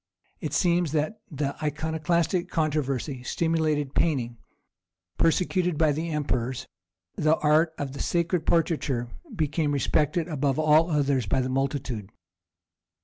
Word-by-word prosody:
It 150 -2 -4
seems 170 0 +2
that 155 +7 -1
the 145 -3 -2
Iconoclastic 160 +4 0
controversy 145 -5 -1
stimulated 155 0 0
painting; 120 -8 0 0.8
persecuted 180 0 +2
by 155 -1 +4
the 160 +4 -2
emperors, 130 -5 -2 0.5
the 155 +1 +3
art 155 +2 +3
of 140 -1 -5
sacred 170 0 0
portraiture 150 -7 +1 0.3
became 155 -2 0
respected 150 +5 +1
above 145 -4 0
all 155 +2 +4
others 140 -6 +1
by 115 - +1
the 130 0 -1
multitude. 130 -6 -2
150 Hz, 115 wpm, -26 LUFS, 135-165 Hz, 0.8 s, by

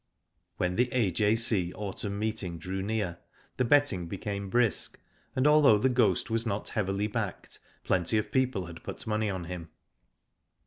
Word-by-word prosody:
When 90 0 -1
the 125 +1 +3
A.J.C. 105 -3 +2
Autumn 100 0 -4
Meeting 105 -5 -2
drew 95 +4 -4
near, 100 -4 -2 0.4
the 130 - +2
betting 115 -10 +3
became 100 +2 -4
brisk, 120 +1 +1 0.4
and 130 +1 +1
although 150 -7 +6
The 130 +6 +2
Ghost 120 -8 +2
was 115 0 +1
not 105 -3 -3
heavily 100 -2 -1
backed 105 -3 -4 0.2
plenty 95 +4 +1
of 105 0 -2
people 130 -7 +1
had 85 -1 -10
put - - -7
money 110 -1 0
on 95 -3 -3
him. 85 -1 -7
105 Hz, 150 wpm, -29 LUFS, 95-115 Hz, 0.4 s, although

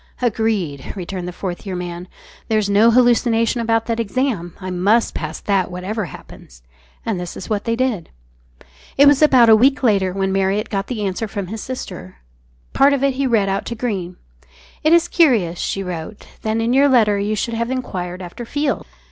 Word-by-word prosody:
"Agreed," 215 - -1
returned 185 -1 -5
the - - -4
Fourth 180 0 -5
Year 190 -3 -5
Man; 175 0 -6 0.4
"there's 215 -2 +1
no 210 +3 +5
hallucination 235 -1 +3
about 225 0 +1
that 230 -1 -2
exam; 225 - -2
I 185 -1 -5
must 200 +6 +2
pass 155 -1 -5
that 195 -3 0
whatever 190 +4 -4
happens." - - -13 0.4
And 215 -5 -1
this 175 -1 -6
was 190 - -8
what 210 -1 -1
they 230 - 0
did. 235 -8 -1 0.9
It 285 - +7
was 285 0 +5
about 260 -6 +6
a 220 - +8
week 265 +5 +3
later 200 -6 +2
when 195 +1 -1
Marriott 195 +3 0
got 195 -1 -2
the 220 -5 -3
answer 195 +3 -2
from 200 -1 -4
his 220 +1 -5
sister. 250 - -7 0.6
Part 280 +1 +5
of 275 -1 -1
it 275 -1 +2
he 270 +1 -1
read 220 -5 +2
out 195 0 -1
to 235 - -4
Greene 195 -7 -4 0.7
"It 310 - +3
is 340 0 +5
curious," 225 - +2
she 195 - -2
wrote, 180 +3 -7 0.2
"that 220 0 -1
in 230 +2 0
your 280 +2 +5
letter 215 -6 +3
you 210 +2 -1
should 230 +3 -2
have 230 +1 -2
enquired 185 -8 -4
after 180 +7 -8
Field. 285 +4 -2
215 Hz, 190 wpm, -19 LUFS, 185-240 Hz, 0.9 s, a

